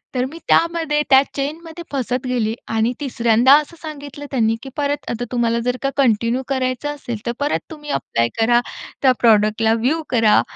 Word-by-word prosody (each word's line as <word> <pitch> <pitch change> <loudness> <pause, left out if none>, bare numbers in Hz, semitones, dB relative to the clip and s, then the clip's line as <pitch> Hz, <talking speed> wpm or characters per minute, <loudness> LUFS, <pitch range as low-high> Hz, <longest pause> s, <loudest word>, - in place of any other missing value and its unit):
तर 250 - +1
मी 330 - -9
त्यामध्ये 330 -3 +2
त्या 265 0 +7
चेनमध्ये 320 +4 -5
फसत 255 -2 -2
गेले 230 -3 0 0.2
आणि 225 +2 +1
तिसऱ्यांदा 240 -1 +3
असं 305 +3 -4
सांगितलं 290 -2 -8
त्यांनी 225 -3 +2
की 270 - -7
परत, 290 0 -2
आता 235 +1 -3
तुम्हाला 235 -1 +1
जर 250 0 0
का 275 - +2
कंटिन्यू 235 -1 +2
करायचं 260 +1 -1
असेल, 240 -5 -5
तर 235 - 0
परत 290 +1 0
तुम्ही 295 -1 -9
ॲप्लाय 115 - 0
करा. 240 +1 +4 0.4
त्या 260 -2 +5
प्रॉडक्टला 220 0 +3
व्ह्यू 260 +8 0
करा. 225 -4 +4
255 Hz, 170 wpm, -20 LUFS, 230-290 Hz, 0.4 s, त्या